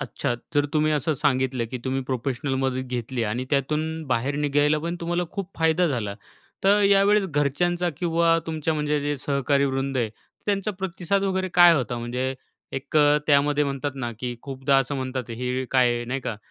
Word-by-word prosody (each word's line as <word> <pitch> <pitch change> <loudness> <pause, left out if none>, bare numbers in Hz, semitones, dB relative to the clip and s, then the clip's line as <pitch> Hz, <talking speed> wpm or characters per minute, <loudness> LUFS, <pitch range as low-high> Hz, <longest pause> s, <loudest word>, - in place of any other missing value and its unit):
अच्छा 120 - -2 0.2
जर 145 0 +3
तुम्ही 155 0 +2
असं 150 +1 +1
सांगितलं, 130 -3 0
की 125 - -4
तुम्ही 135 0 -1
प्रोफेशनल 130 +2 -2
मदत 130 -1 -1
घेतली 125 0 -3
आणि 115 +4 -2
त्यातून 150 +2 +1 0.2
बाहेर 130 +2 0
निघायला 145 +1 +2
पण 170 +1 -2
तुम्हाला 175 +1 -1
खूप 195 -2 -5
फायदा 160 +2 +3
झाला. 110 -8 -2 0.5
तर 200 +2 +5
यावेळेस 200 +1 +4
घरच्यांचा 175 +4 0
किंवा 165 -1 +2
तुमच्या 160 0 -1
म्हणजे 150 0 0
जे 145 0 -1
सहकारी 140 0 +1
वृंद 135 0 -1
आहे 115 -4 0 0.4
त्यांचा 200 0 0
प्रतिसाद 190 +1 -1
वगैरे 190 -1 0
काय 175 -1 +8
होता 120 -4 -1
म्हणजे 125 +3 -2 0.4
एक 135 +3 -3
अ, 150 0 +5
त्यामध्ये 145 0 +3
म्हणतात 140 +1 -2
ना, 120 -3 -3
की 125 -1 -3
खूपदा 135 0 0
असं 135 +2 -1
म्हणतात, 130 -2 -4
"हे 125 +2 -2
काय 120 -2 +2
नाही 130 +3 -3
का 115 - -4
140 Hz, 175 wpm, -24 LUFS, 130-160 Hz, 0.5 s, काय